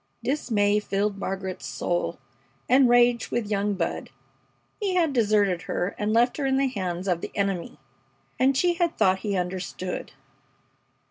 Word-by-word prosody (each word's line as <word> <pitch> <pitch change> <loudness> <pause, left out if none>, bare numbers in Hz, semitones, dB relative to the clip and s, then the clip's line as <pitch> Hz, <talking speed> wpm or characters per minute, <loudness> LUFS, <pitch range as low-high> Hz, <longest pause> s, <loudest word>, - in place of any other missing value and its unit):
Dismay 215 -6 +1
filled 200 0 -1
Margaret's 190 -7 -4
soul, 175 +5 -2 0.5
and 255 0 +5
rage 240 -1 +4
with 215 -3 -2
young 205 0 0
Bud. - - -3 0.7
He 395 -4 -1
had 330 -5 +2
deserted 205 -6 +2
her 180 - 0
and 210 +1 -1
left 235 +2 +3
her 290 - -1
in 265 0 +2
the 270 0 +2
hands 185 -5 -3
of 175 -2 0
the - - -5
enemy! 195 -6 -2 0.6
And 265 +1 +3
she 350 +3 +3
had 340 -1 -1
thought 190 0 +3
he 200 -2 -2
understood! 180 0 -4
210 Hz, 150 wpm, -25 LUFS, 190-250 Hz, 0.7 s, and